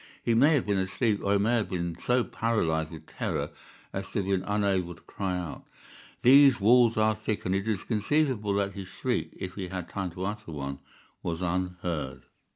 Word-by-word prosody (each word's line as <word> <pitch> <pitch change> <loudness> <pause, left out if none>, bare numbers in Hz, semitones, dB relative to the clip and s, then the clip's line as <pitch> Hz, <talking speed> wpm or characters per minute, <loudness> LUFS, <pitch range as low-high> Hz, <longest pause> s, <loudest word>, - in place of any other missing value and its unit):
He 115 - +2
may 140 +7 +5
have 135 - +1
been 100 -2 +1
asleep, 100 +3 0
or 100 - +2
he - - +4
may 110 +4 +2
have 110 - -1
been 85 -2 -2
so 125 0 +1
paralyzed 80 -11 0
with 80 -1 -10
terror - - -3 0.4
as 95 0 -4
to - - -19
have 100 - 0
been 95 -1 +1
unable 100 -4 0
to - - -20
cry 95 -2 -3
out. 90 -3 -6 0.6
These 135 0 +7
walls 115 +2 +5
are 110 0 +4
thick, 110 0 -3
and 90 - +1
it 100 +2 -1
is 105 -4 -1
conceivable 110 -2 +1
that 100 0 0
his 95 -2 -7
shriek, - - -2
if 90 -1 -5
he 95 -2 -5
had 90 -2 -5
time 95 -2 -3
to 90 +2 -4
utter 105 -3 -5
one, 70 -1 -5 0.4
was 85 +1 -3
unheard. 90 -6 -2
100 Hz, 200 wpm, -28 LUFS, 90-110 Hz, 0.6 s, These